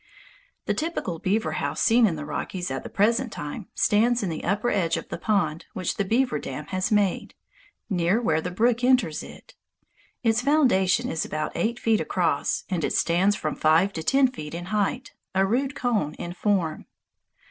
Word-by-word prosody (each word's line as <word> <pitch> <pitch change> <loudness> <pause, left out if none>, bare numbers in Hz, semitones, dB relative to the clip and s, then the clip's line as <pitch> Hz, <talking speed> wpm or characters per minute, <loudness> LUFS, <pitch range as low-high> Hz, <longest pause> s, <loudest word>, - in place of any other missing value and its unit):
The - - +1
typical 305 - -3
beaver 205 +5 0
house - - -2
seen 230 0 +5
in 170 - -1
the 150 -1 -6
Rockies 175 +1 -4
at 135 - -3
the - - -8
present 230 +4 +1
time 150 +7 -6
stands 235 +3 +2
in 190 - -1
the 160 - -5
upper 205 +6 0
edge 170 -4 +1
of - - -7
the - - -4
pond 170 -7 0
which 185 -2 -3
the 200 - +1
beaver 245 +6 +1
dam - - -6
has 185 +2 -1
made, 205 -3 +1 0.5
near 180 +1 +1
where 160 -9 +1
the 180 - -3
brook 230 +6 +1
enters 250 -12 +3
it. - - -13 0.7
Its 225 0 +2
foundation 245 -6 +3
is 160 - -1
about 155 0 -3
eight 225 +8 -1
feet 225 -2 +1
across, 170 -6 0
and 180 -4 -2
it - - 0
stands 185 +5 +2
from 155 -4 -3
five 165 +6 +3
to 160 - -4
ten 270 +10 +4
feet 165 - -7
in 175 +1 -5
height, 215 +5 -1 0.2
a 190 +1 +4
rude 260 +6 0
cone 215 - -1
in 175 - -6
form. 180 -5 -1
200 Hz, 185 wpm, -25 LUFS, 170-235 Hz, 0.7 s, seen